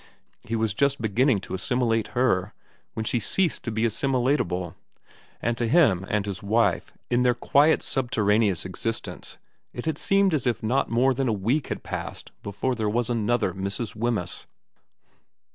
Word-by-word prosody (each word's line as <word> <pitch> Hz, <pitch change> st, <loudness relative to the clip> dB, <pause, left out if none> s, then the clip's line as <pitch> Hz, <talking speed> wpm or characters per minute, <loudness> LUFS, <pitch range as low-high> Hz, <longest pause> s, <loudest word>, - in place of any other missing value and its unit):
He 115 Hz, -, -3 dB
was 110 Hz, -2 st, 0 dB
just 140 Hz, +4 st, +1 dB
beginning 115 Hz, +1 st, +2 dB
to -, -, -8 dB
assimilate 115 Hz, +3 st, 0 dB
her 105 Hz, -6 st, +1 dB, 0.4 s
when 110 Hz, 0 st, -3 dB
she 120 Hz, -, 0 dB
ceased 175 Hz, -, 0 dB
to 120 Hz, -, -2 dB
be 110 Hz, +1 st, -1 dB
assimilatable, 115 Hz, -, 0 dB, 0.7 s
and 120 Hz, +1 st, +1 dB
to 120 Hz, -, +1 dB
him 110 Hz, -, +3 dB
and 105 Hz, -1 st, 0 dB
his 100 Hz, -2 st, -5 dB
wife 110 Hz, +3 st, +1 dB, 0.2 s
in 120 Hz, 0 st, +3 dB
their 125 Hz, -1 st, +3 dB
quiet 145 Hz, +5 st, +3 dB
subterraneous 105 Hz, -, +1 dB
existence 115 Hz, +5 st, -5 dB, 0.4 s
it 120 Hz, -, -6 dB
had 160 Hz, -2 st, -1 dB
seemed 195 Hz, -2 st, +3 dB
as 140 Hz, -5 st, 0 dB
if 120 Hz, -, -1 dB
not 130 Hz, +5 st, +1 dB
more 125 Hz, +3 st, +3 dB
than 135 Hz, +1 st, -1 dB
a -, -, +2 dB
week 115 Hz, +8 st, 0 dB
had -, -, -5 dB
passed -, -, -6 dB
before 100 Hz, +6 st, -2 dB
there 110 Hz, -3 st, -1 dB
was 120 Hz, +2 st, 0 dB
another 115 Hz, -4 st, +1 dB
Mrs. 100 Hz, +4 st, -4 dB
Wemyss. 110 Hz, -6 st, -2 dB
115 Hz, 160 wpm, -25 LUFS, 105-130 Hz, 0.7 s, him